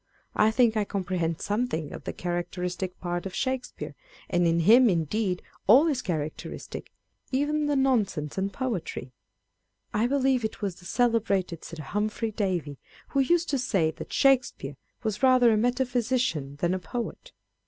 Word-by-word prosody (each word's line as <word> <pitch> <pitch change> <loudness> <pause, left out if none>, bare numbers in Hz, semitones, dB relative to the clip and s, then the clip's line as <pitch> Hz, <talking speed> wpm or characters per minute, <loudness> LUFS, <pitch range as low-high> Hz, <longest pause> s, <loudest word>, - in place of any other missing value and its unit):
I 215 - +5
think 230 0 +3
I 215 - +2
com 200 -1 -3
prehend 170 -3 -1
something 205 -7 -1
of - - -9
the - - -2
characteristic 180 +1 -3
part 175 +1 -3
of 190 - -8
Shake 260 -2 -1
speare; - - -8 0.4
and 175 0 +3
in 165 0 +2
him 235 +7 +7
indeed 180 +2 0 0.2
all 255 +10 +8
is 285 -6 +1
characteristic, 155 -6 -5 0.4
even 295 +3 +1
the 290 - +1
nonsense 215 - +1
and 195 +1 -1
poetry. 190 - -4 0.8
I 220 +3 +2
believe 265 -2 +2
it 220 - -3
was 195 -4 -3
the 180 - -16
celebrated 205 -7 +1
Sir 160 -2 -8
Humphry 215 +6 -2
Davy 180 - -2 0.3
who 275 - 0
used 340 +5 +2
to 275 - +1
say, 185 -10 +1
that - - -9
Shakespeare 255 - +2 0.3
was 215 -1 -2
rather 255 -3 +6
a - - +3
metaphysician 245 - 0
than 175 +5 0
a 185 - -1
poet. 240 - -5
210 Hz, 160 wpm, -27 LUFS, 175-250 Hz, 0.8 s, all